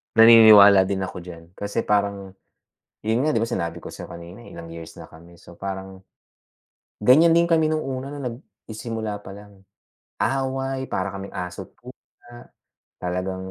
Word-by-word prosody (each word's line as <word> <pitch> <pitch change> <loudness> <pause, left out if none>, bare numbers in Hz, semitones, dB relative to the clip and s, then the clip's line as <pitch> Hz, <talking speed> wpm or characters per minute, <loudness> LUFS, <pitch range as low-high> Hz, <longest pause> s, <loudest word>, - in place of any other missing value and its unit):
Naniniwala 110 -4 +8
din 95 -1 -2
ako 95 - -6
diyan 85 -1 -11 0.2
kasi 100 +3 -3
parang, 100 -2 -1 0.7
yun 110 +2 0
nga, 155 - +1
'di 115 - +1
ba 115 - -2
sinabi 85 -6 -4
ko - - -8
sa'yo - - -9
kanina, 85 +7 -11
ilang 85 -1 -10
years 85 0 -10
na - - -12
kami, 85 +2 -16
so, 85 - -16
parang 95 -1 -7 0.9
ganyan 135 +10 +5
din 170 +1 +4
kami 160 -2 +2
no'ng 155 - 0
una 135 +1 -5
nagsisimula 115 -4 -7
pa - - -11
lang. 100 0 -14 0.5
Away, 135 0 -2
para 95 +1 -3
kaming 100 0 -8
aso't 90 -1 -7
pusa, 120 0 -16 0.5
talagang 95 +1 -4
100 Hz, 150 wpm, -23 LUFS, 95-120 Hz, 0.9 s, Naniniwala